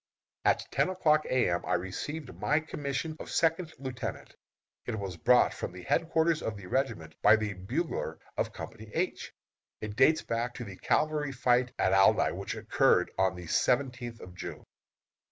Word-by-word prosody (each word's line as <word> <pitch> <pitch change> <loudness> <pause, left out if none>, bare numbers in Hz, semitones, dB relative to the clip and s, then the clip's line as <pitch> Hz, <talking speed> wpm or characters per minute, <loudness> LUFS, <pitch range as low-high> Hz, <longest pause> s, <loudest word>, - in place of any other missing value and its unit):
At - - +3
ten - - +2
o'clock 155 -5 +3
A. 130 -1 +3
M. 85 - -1
I - - +1
received 125 - -4
my 150 +2 +2
commission 155 0 -4
of - - -8
second 165 0 +1
lieutenant. 130 -2 -6 0.5
It 110 - -2
was 95 -3 -4
brought 125 +9 +4
from - - -5
the 90 0 -9
headquarters 165 -1 +2
of 110 -2 -3
the 100 - -10
regiment 90 -8 -2
by 110 - +7
the 110 -2 -2
bugler 95 0 -3 0.2
of - - -1
Company 110 -1 -9
H. - - -2 0.5
It 105 -1 -5
dates 155 +7 +4
back 120 +1 -2
to 120 - -5
the 100 -4 -8
cavalry 150 -2 +1
fight 125 -1 +2
at 95 - +2
Aldie, 95 -2 +5
which - - -4
occurred - - +2
on 95 -1 +3
the 90 -1 -8
seventeenth 120 +3 0
of 90 - -10
June. - - -7
120 Hz, 170 wpm, -30 LUFS, 95-150 Hz, 0.5 s, by